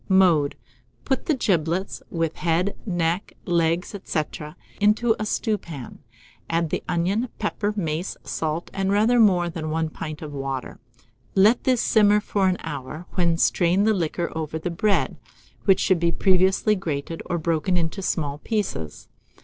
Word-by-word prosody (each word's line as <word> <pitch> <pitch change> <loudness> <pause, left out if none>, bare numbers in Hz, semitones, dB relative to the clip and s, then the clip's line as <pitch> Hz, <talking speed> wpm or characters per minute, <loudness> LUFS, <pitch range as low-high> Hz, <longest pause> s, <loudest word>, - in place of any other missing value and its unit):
Mode. 175 -7 +4 0.5
Put 265 - -1
the 310 - +3
giblets, 180 -5 0
with 165 -2 -1
the - - -17
head, 175 +4 +1
neck, 175 +1 -1
legs, 170 +2 +1
&c., 155 - 0 0.6
into 220 +3 +3
a 215 - -2
stewpan; 170 - -3 0.5
add 165 -1 0
the - - -1
onion, 195 +8 0
pepper, 210 -1 -1
mace, 165 0 -2
salt, 160 +1 -3
and 195 0 0
rather 220 +4 +4
more 185 -6 +4
than 165 -2 -4
1 160 0 0
pint 155 0 -6
of 150 -1 -7
water. 135 -2 -4 0.6
Let 210 +5 +4
this 255 -3 +3
simmer 210 -1 +5
for 200 -2 0
an 185 -1 +1
hour, 150 +2 -6
when 170 -3 +1
strain 180 +3 +3
the 220 +1 +4
liquor 170 -2 -1
over 160 -1 -3
the 165 +2 -3
bread, 200 +4 +1 0.5
which 195 -2 +5
should 185 -3 +2
be 170 0 +2
previously 190 +4 +3
grated 165 -3 -4
or 175 - -1
broken 165 +2 0
into 170 +4 -1
small 150 -6 -1
pieces. 180 - -3
175 Hz, 155 wpm, -24 LUFS, 160-200 Hz, 0.6 s, simmer